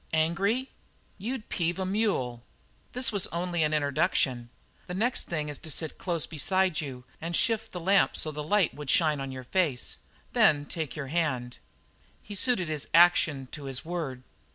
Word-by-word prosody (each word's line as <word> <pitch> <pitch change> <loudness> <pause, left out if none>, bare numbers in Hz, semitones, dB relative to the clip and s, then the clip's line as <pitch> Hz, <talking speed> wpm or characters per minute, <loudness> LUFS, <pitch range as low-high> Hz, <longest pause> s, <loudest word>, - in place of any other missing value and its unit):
"Angry?" 195 +11 +1 0.5
"You'd 225 +3 -4
peeve 175 -1 -1
a 190 - -1
mule." 185 - 0 0.5
"This 250 0 +2
was 200 -3 0
only 175 0 -2
an 155 0 +2
introduction. 135 -4 +1 0.4
The 180 - -4
next 235 +6 +1
thing 155 -3 -1
is 145 -1 -5
to 160 - -7
sit 155 +1 -3
close 170 -4 -1
beside 185 +2 +1
you 130 -4 -7 0.2
and 170 +1 -2
shift 225 +2 +1
the 180 - -5
lamp 195 +3 +3
so 155 - -2
that 150 0 -5
the - - -4
light 190 +3 +2
would 150 -2 -7
shine 155 -2 +3
on 135 0 -4
your 130 -1 -7
face; 145 -3 0 0.3
then 145 -1 +4
take 160 -2 -4
your 140 -3 -5
hand 130 -8 -1 0.3
" - - -34
He 205 - -8
suited 200 -3 +1
his 150 -7 -2
action 165 -5 +5
to 145 -2 -8
his 135 0 -4
word. 155 -7 -4
160 Hz, 180 wpm, -28 LUFS, 140-190 Hz, 0.5 s, action